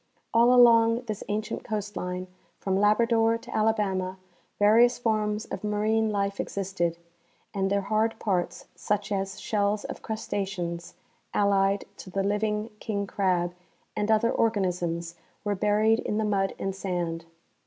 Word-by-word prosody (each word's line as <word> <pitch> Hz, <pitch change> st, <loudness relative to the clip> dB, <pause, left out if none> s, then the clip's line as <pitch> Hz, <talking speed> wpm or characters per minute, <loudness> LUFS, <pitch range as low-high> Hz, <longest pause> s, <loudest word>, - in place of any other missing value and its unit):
All 235 Hz, +2 st, +6 dB
along 230 Hz, -1 st, +6 dB
this 215 Hz, -5 st, -5 dB
ancient 210 Hz, +1 st, -2 dB
coast 210 Hz, -1 st, -4 dB
line, 180 Hz, 0 st, -3 dB, 0.3 s
from 190 Hz, -1 st, -1 dB
Labrador 225 Hz, +3 st, +3 dB
to -, -, -9 dB
Alabama, 195 Hz, -4 st, 0 dB, 0.4 s
various 230 Hz, +4 st, +5 dB
forms 215 Hz, -2 st, 0 dB
of -, -, -6 dB
marine 215 Hz, +1 st, +1 dB
life 200 Hz, -1 st, -1 dB
existed, 185 Hz, -4 st, -2 dB, 0.6 s
and 195 Hz, -1 st, 0 dB
their 200 Hz, 0 st, +1 dB
hard 215 Hz, +3 st, 0 dB
parts, 185 Hz, -6 st, -2 dB
such 210 Hz, 0 st, -2 dB
as 195 Hz, 0 st, -2 dB
shells 205 Hz, -1 st, 0 dB
of -, -, -7 dB
crustaceans 190 Hz, -6 st, -4 dB, 0.4 s
(allied 200 Hz, -1 st, +2 dB
to -, -, -10 dB
the 195 Hz, +1 st, -1 dB
living 210 Hz, +2 st, -1 dB
king 200 Hz, -2 st, -2 dB
crab) 180 Hz, -3 st, 0 dB, 0.4 s
and 210 Hz, +1 st, -1 dB
other 220 Hz, +1 st, +3 dB
organisms, 175 Hz, -6 st, 0 dB, 0.3 s
were 205 Hz, -1 st, 0 dB
buried 210 Hz, +3 st, +3 dB
in 210 Hz, -, -2 dB
the 220 Hz, -, +1 dB
mud 195 Hz, -2 st, 0 dB
and 195 Hz, -1 st, -3 dB
sand. 175 Hz, -4 st, -3 dB
205 Hz, 140 wpm, -27 LUFS, 195-220 Hz, 0.6 s, All